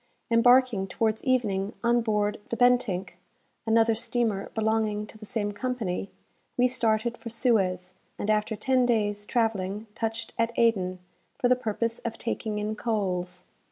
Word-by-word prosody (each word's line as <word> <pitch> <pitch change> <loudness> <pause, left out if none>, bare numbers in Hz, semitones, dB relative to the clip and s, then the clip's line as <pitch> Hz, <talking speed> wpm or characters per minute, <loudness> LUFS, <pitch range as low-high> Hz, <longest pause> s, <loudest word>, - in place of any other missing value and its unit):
Embarking, 235 -3 +4
towards 220 +3 -1
evening, 210 -6 0
on 240 0 +3
board 210 -2 0
the 235 - -2
"Bentinck," 245 -8 +2 0.5
another 225 0 +4
steamer 230 -3 -1
belonging 220 -1 0
to 215 - -12
the 215 -1 -11
same 205 -2 -1
company, 205 -4 -3 0.5
we 250 0 +5
started 230 -1 0
for 230 - -7
Suez, 190 -7 +1 0.2
and - - -4
after 215 +1 +1
ten 255 +3 +2
days' 205 -3 0
travelling 215 -3 0
touched 225 +1 -3
at 230 0 0
Aden, 190 -6 +2 0.4
for 255 - +2
the 255 - +6
purpose 230 -1 -2
of 230 -1 -5
taking 220 -2 -3
in 210 +1 -2
coals. 180 -5 -2
220 Hz, 145 wpm, -27 LUFS, 205-235 Hz, 0.5 s, the